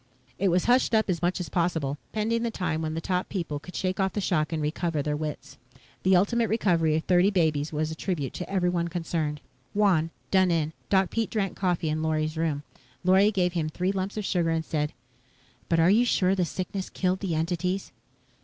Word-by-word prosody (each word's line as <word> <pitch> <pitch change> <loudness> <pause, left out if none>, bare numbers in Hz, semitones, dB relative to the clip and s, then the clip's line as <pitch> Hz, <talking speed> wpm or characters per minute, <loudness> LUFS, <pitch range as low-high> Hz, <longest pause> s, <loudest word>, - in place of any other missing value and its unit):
It 200 - +2
was 180 0 +2
hushed 245 -1 +3
up 220 -3 +2
as 170 - -2
much 175 +2 0
as 180 - -3
possible, 160 -5 -1
pending 225 +2 0
the 235 - 0
time 170 -7 -2
when 155 0 -2
the 165 - -2
top 180 +1 -1
people 165 -7 -3
could 180 +5 -12
shake 185 0 -1
off 190 -1 +1
the - - -1
shock 165 -6 0
and 160 - -1
recover 155 0 -1
their 150 0 -1
wits. 150 0 -6 0.4
The 190 0 +4
ultimate 225 +5 +2
recovery 170 -8 +2
of 160 - 0
thirty 180 +1 +4
babies 160 -6 +1
was 155 0 -1
a - - -5
tribute 155 -7 -3
to 180 - -6
everyone 180 -3 +1
concerned. 165 -3 -2 0.3
Wan, 185 -6 +3 0.2
done 190 -1 +4
in, 160 -2 0 0.2
Doc 190 -2 +3
Pete 225 -2 -1
drank 200 -4 -1
coffee 180 -4 0
in 155 +1 -1
Lorry's 155 0 0
room. 160 -3 -1 0.4
Lorry 190 +3 +5
gave 180 -4 +1
him 160 -3 -1
three 180 +4 -1
lumps 195 +1 -3
of 210 - -2
sugar 175 -4 +1
and 165 0 0
said, 150 -1 -1 0.8
"But 165 - +3
are 165 +3 +5
you 225 +4 +5
sure 190 -6 +2
the 185 -2 +1
sickness 190 +2 -4
killed 185 0 0
the 185 -5 -2
entities?" 175 +4 -1
175 Hz, 210 wpm, -27 LUFS, 160-190 Hz, 0.8 s, Lorry